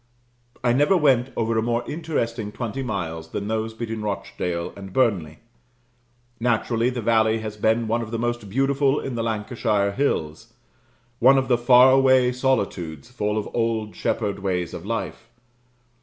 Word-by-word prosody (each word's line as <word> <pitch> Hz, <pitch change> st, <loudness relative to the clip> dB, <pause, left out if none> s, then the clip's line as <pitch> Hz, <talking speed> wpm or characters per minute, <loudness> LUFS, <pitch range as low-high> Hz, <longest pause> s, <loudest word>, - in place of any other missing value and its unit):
I 120 Hz, -1 st, +3 dB
never 145 Hz, +9 st, +4 dB
went 135 Hz, -5 st, +3 dB
over 115 Hz, 0 st, 0 dB
a 110 Hz, -, +2 dB
more 120 Hz, +1 st, 0 dB
interesting 115 Hz, -9 st, -3 dB
twenty 120 Hz, +4 st, -4 dB
miles 85 Hz, -9 st, -4 dB
than 100 Hz, +4 st, -4 dB
those 110 Hz, 0 st, -2 dB
between 115 Hz, -1 st, -4 dB
Rochdale 90 Hz, -4 st, -3 dB
and 95 Hz, -1 st, -9 dB
Burnley. 100 Hz, -10 st, +1 dB, 1.0 s
Naturally, 115 Hz, 0 st, +1 dB
the 125 Hz, -2 st, -4 dB
valley 110 Hz, 0 st, +3 dB
has 110 Hz, -1 st, -5 dB
been 110 Hz, +2 st, +1 dB
one 115 Hz, +2 st, 0 dB
of 115 Hz, -, -6 dB
the 115 Hz, -, -3 dB
most 120 Hz, -2 st, -3 dB
beautiful 135 Hz, +4 st, +1 dB
in 135 Hz, -, -5 dB
the 115 Hz, -, -2 dB
Lancashire 110 Hz, -2 st, 0 dB
hills; 80 Hz, -, -2 dB, 0.7 s
one 130 Hz, +3 st, +6 dB
of 135 Hz, 0 st, 0 dB
the 125 Hz, -, +5 dB
far 125 Hz, +1 st, +7 dB
away 130 Hz, -1 st, +4 dB
solitudes, 100 Hz, -, -2 dB
full 105 Hz, -3 st, -2 dB
of 105 Hz, -, -2 dB
old 115 Hz, -2 st, -1 dB
shepherd 105 Hz, -3 st, -2 dB
ways 90 Hz, -3 st, -2 dB
of 85 Hz, -, -7 dB
life. 115 Hz, 0 st, -4 dB
115 Hz, 155 wpm, -23 LUFS, 105-125 Hz, 1.0 s, far